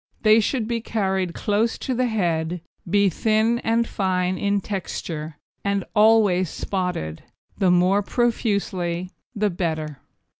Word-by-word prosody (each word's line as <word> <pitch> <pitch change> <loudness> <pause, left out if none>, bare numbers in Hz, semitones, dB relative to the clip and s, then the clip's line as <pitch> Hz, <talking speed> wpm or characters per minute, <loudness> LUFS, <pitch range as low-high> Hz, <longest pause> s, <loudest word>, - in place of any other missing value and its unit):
They 215 0 +6
should 225 +1 0
be 235 -1 -1
carried 190 -6 -1
close 215 +2 0
to 260 - -3
the 250 +1 +1
head, 175 -6 -1 0.3
be 200 +2 +4
thin 220 +5 +2
and 230 0 +1
fine 185 -1 0
in 200 +2 0
texture, 165 -6 -5 0.3
and 200 -2 0
always 210 -5 +4
spotted 180 - -3 0.4
the 190 - +3
more 180 +3 +4
profusely 195 -6 -1 0.2
the 210 -1 +1
better. 155 -4 -3
195 Hz, 125 wpm, -23 LUFS, 180-220 Hz, 0.4 s, They